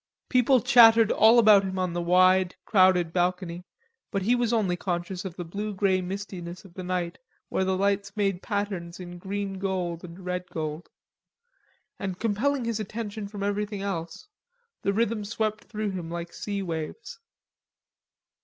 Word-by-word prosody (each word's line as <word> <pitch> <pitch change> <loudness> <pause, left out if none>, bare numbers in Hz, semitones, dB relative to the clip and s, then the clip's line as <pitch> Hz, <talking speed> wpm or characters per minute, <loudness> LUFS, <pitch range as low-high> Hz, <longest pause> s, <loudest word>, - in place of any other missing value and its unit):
People 255 0 +4
chattered 230 -3 +7
all 225 +3 +6
about 215 -4 +7
him 190 -1 -4
on 185 -2 -1
the 175 - -1
wide, 185 +1 +4
crowded 185 -4 +4
balcony, 180 -1 -1 0.5
but 195 -3 -2
he 230 +5 +3
was 240 -2 +1
only 210 -6 +1
conscious 175 +1 -3
of 180 -3 -6
the 180 - -5
blue 205 +4 -4
grey 190 -1 +2
mistiness 180 -1 -6
of 185 - -15
the 185 - -7
night 180 -1 -3 0.3
where - - 0
the 190 0 0
lights 200 +1 0
made 195 -3 0
patterns 195 -5 -3
in 175 -1 -8
green 195 +1 -4
gold 185 -3 -2
and 180 +1 -10
red 180 0 -3
gold. 155 -1 -5 1.1
And 190 -2 -4
compelling 235 +5 0
his 230 -2 -1
attention 215 0 -5
from 200 -1 -6
everything 205 0 -2
else, 170 - -5 0.5
the 200 - +1
rhythm 220 +1 0
swept 215 0 -2
through 215 -2 -3
him 175 -3 -5
like 170 0 -6
sea 200 -1 -4
waves. 165 - -5
195 Hz, 160 wpm, -27 LUFS, 180-210 Hz, 1.1 s, chattered